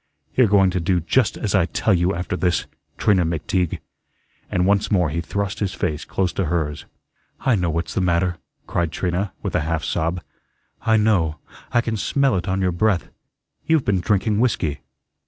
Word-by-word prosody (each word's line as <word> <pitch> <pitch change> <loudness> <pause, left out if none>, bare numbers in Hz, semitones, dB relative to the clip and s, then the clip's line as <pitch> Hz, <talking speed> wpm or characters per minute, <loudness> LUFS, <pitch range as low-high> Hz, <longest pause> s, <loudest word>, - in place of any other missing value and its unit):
You're 130 -3 +5
going 95 -2 +4
to 90 - -1
do 90 +1 +1
just 125 +10 +1
as 105 - -2
I 95 -4 +3
tell 110 - +1
you 90 +1 +2
after 90 0 -3
this, 90 -1 0 0.3
Trina 95 -4 +3
McTeague," 85 +2 -1 0.7
and 90 0 +1
once 100 +1 +2
more 90 -7 +2
he 85 +2 -1
thrust 100 +3 -3
his 100 -2 -2
face 80 -2 -2
close 95 -2 -1
to 95 - -1
hers. 75 -3 -2 0.6
"I 130 - +2
know 90 -5 +1
what's 80 0 -2
the - - 0
matter," 90 0 +1 0.3
cried 85 -3 -1
Trina, 90 +3 -1
with - - -3
a - - +2
half 80 0 -1
sob; 85 +1 -1 0.6
"I 110 -1 +3
know, 95 -8 +2 0.3
I 120 - +3
can 115 -2 -2
smell 135 +5 +1
it 90 +1 -2
on 95 0 0
your 90 -1 +2
breath. 95 +1 +1 0.6
You've 160 -4 +3
been 100 -3 +2
drinking 100 +3 +1
whiskey." 85 - 0
90 Hz, 185 wpm, -22 LUFS, 85-100 Hz, 0.7 s, You're